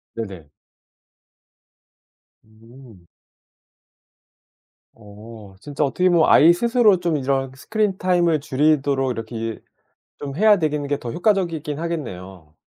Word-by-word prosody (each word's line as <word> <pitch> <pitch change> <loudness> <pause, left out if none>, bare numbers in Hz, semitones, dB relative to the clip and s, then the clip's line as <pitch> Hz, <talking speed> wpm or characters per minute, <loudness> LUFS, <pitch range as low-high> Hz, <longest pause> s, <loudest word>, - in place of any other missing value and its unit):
네네. 95 -10 -8 1.9
음. 110 -3 -18 1.9
어. 105 -1 -14
진짜 145 +5 -4
어떻게 180 +7 +1
보면 170 -2 +3
아이 165 +3 +6
스스로 230 -2 +2
좀 170 -3 -1
이런 135 -1 -2
스크린 210 +5 -2
타임을 175 -3 +1
줄이도록 140 -2 0
이렇게 115 0 -7
일 115 0 -6 0.6
좀 140 0 -6
해야 210 +1 +4
되는 150 -3 -2
게 145 0 -1
더 120 -2 -7
효과적이긴 170 -7 -1
하겠네요. 95 - -7
140 Hz, 230 characters per minute, -21 LUFS, 115-170 Hz, 1.9 s, 아이